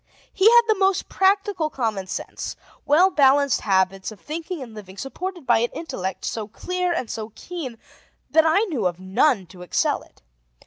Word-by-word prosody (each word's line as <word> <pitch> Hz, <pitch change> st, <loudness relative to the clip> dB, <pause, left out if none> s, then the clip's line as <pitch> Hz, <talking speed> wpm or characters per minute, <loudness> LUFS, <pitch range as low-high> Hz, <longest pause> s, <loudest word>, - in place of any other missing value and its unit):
He 390 Hz, +3 st, +6 dB
had 475 Hz, 0 st, +7 dB
the 435 Hz, -, +5 dB
most 385 Hz, -1 st, +2 dB
practical 385 Hz, -4 st, +2 dB
common 220 Hz, -9 st, -2 dB
sense -, -, -5 dB, 0.3 s
well 350 Hz, +7 st, +5 dB
balanced 280 Hz, -3 st, +4 dB
habits 190 Hz, 0 st, +1 dB
of 215 Hz, -, -12 dB
thinking 330 Hz, +3 st, -5 dB
and 235 Hz, -3 st, -11 dB
living, 200 Hz, -3 st, -11 dB
supported 350 Hz, -, -6 dB
by 235 Hz, -3 st, +4 dB
an 235 Hz, +1 st, +1 dB
intellect 190 Hz, -, -4 dB
so 220 Hz, -2 st, -3 dB
clear 360 Hz, -, -2 dB
and 335 Hz, -8 st, -2 dB
so 220 Hz, 0 st, -5 dB
keen 310 Hz, -10 st, -7 dB, 0.5 s
that 320 Hz, +2 st, +5 dB
I 320 Hz, +5 st, +3 dB
knew 320 Hz, -, 0 dB
of 175 Hz, 0 st, -4 dB
none 195 Hz, +3 st, +2 dB
to 180 Hz, -, -13 dB
excel 180 Hz, -, 0 dB
it. -, -, -21 dB
275 Hz, 175 wpm, -23 LUFS, -, 0.5 s, had